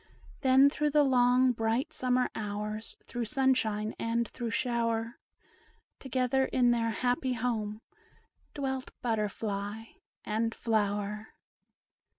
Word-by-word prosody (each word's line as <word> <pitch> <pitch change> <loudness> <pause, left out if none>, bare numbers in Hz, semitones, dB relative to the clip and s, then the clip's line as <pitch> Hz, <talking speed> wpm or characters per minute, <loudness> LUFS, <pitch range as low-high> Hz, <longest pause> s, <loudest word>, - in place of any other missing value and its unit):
Then, 265 0 +6
through 300 +1 +1
the 295 0 +4
long, 250 -1 +4
bright 230 +5 -1
summer 250 0 +1
hours 210 +1 -4
Through 240 -1 -3
sunshine 220 -4 +1
and 230 0 0
through 240 -2 -5
shower, 230 -2 -1 0.8
Together 265 0 +1
in 245 -2 +3
their 230 -1 +1
happy 250 +3 0
home 220 -3 -2 0.7
Dwelt 265 -2 -3
butterfly 210 -2 -2 0.4
and 225 +2 -1
flower. 210 -1 -1
235 Hz, 105 wpm, -30 LUFS, 220-255 Hz, 0.8 s, Then